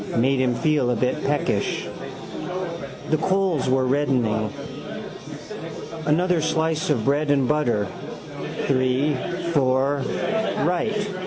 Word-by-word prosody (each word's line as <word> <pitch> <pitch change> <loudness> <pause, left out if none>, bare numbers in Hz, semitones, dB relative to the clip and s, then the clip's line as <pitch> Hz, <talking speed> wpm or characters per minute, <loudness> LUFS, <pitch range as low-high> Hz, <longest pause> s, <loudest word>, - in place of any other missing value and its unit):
Made 130 +3 +3
him 125 -2 +2
feel 150 -5 +2
a - - +2
bit 125 +3 0
peckish. 145 +1 0 1.2
The 155 - +3
coals 185 -5 +1
were 130 0 +3
reddening. 125 -6 +1 1.5
Another 175 +2 +3
slice 160 0 +1
of 120 -7 +2
bread 145 +2 +2
and 140 -3 +3
butter: 120 -9 +2 0.8
three, 130 +2 +2 0.4
four: 135 0 +3 0.7
right. 205 +3 0
145 Hz, 100 wpm, -24 LUFS, 130-160 Hz, 1.5 s, Made